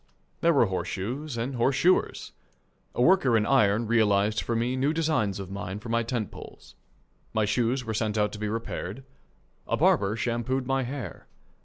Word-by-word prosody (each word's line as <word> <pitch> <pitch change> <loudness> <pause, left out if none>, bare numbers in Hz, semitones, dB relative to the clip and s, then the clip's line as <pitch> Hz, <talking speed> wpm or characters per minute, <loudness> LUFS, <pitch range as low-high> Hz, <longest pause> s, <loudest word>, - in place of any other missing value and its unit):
There 170 - +4
were 140 -7 +4
horseshoes 110 - -4
and 120 +4 -2
horseshoers. 135 +9 +1 0.6
A 120 - +2
worker 135 -9 +4
in 105 - +1
iron 115 -4 +3
realized 105 -2 +2
for 115 - -2
me 120 +3 0
new 135 +4 +1
designs 155 - 0
of 95 -1 -7
mine 100 -1 -5
for 110 +3 -9
my 115 +1 +2
tent 115 -2 -3
poles. - - -12 0.6
My 110 -1 +3
shoes 125 +4 0
were 110 - -3
sent 110 0 -1
out 105 0 +1
to 105 - -8
be 105 0 -2
repaired. 115 +1 -4 0.6
A - - 0
barber 100 +1 +3
shampooed 120 +3 -1
my 135 +1 +1
hair. 125 - -6
115 Hz, 170 wpm, -27 LUFS, 105-130 Hz, 0.6 s, There